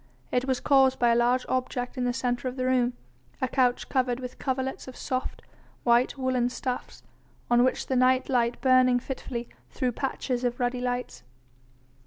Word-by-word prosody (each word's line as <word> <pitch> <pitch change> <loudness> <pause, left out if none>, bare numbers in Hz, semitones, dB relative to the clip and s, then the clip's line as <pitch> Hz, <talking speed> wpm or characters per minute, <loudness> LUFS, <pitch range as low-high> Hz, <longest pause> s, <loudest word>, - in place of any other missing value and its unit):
It 250 +1 +1
was 260 -2 0
caused 265 -2 +4
by 240 - +3
a - - +4
large 245 +2 +2
object 250 0 -2
in 250 -2 -1
the 245 - +1
centre 245 +1 -2
of 250 - -4
the 255 -1 -2
room, 250 -1 +2 0.5
a 260 - 0
couch 250 -2 +1
covered 255 -2 0
with 250 -1 -8
coverlets 265 0 -3
of 260 - -9
soft, 255 -2 -4 0.4
white 240 +3 +3
woollen 255 -2 +1
stuffs, 250 0 -5 0.5
on 240 0 +5
which 255 - 0
the 260 - -1
night 255 +1 +3
light 240 -2 +1
burning 255 -1 +5
fitfully 245 -2 -5 0.2
threw 250 -1 -1
patches 255 0 -3
of 245 -1 -1
ruddy 245 0 -1
lights. 245 - -3
255 Hz, 175 wpm, -27 LUFS, 245-260 Hz, 0.5 s, on